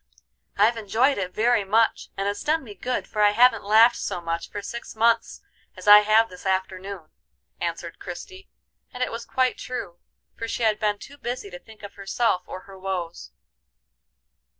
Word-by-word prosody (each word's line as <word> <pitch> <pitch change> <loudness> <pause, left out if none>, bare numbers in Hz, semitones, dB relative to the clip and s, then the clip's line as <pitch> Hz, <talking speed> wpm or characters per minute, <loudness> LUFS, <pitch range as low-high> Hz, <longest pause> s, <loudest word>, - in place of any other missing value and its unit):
"I've 220 +4 +4
enjoyed 225 +5 +1
it 185 -1 -3
very 225 +1 +2
much, 220 +4 +1
and 195 +1 -1
it's 205 0 -2
done 315 +1 +1
me 215 -5 -10
good, 250 +6 -3
for 210 - -2
I 205 0 +5
haven't 235 0 +4
laughed 220 +4 +5
so - - -3
much 170 0 -4
for 205 -1 -6
six 235 +1 -7
months 230 +1 +1 0.4
as - - -10
I 205 0 +11
have 215 +2 +4
this 180 -2 -13
afternoon," 190 -2 -3 0.5
answered - - -4
Christie, 385 0 -9 0.4
and 250 - -3
it - - -2
was 230 - -6
quite 255 -1 0
true, 180 -9 -6 0.4
for 230 - -5
she 230 - -3
had 215 -1 +2
been 210 -1 0
too 285 +7 -13
busy 240 -4 -5
to 175 - -8
think 220 +1 -17
of 205 - -9
herself 200 0 0
or 185 - -7
her 195 0 -14
woes. 180 - -4
210 Hz, 180 wpm, -24 LUFS, 195-235 Hz, 0.5 s, I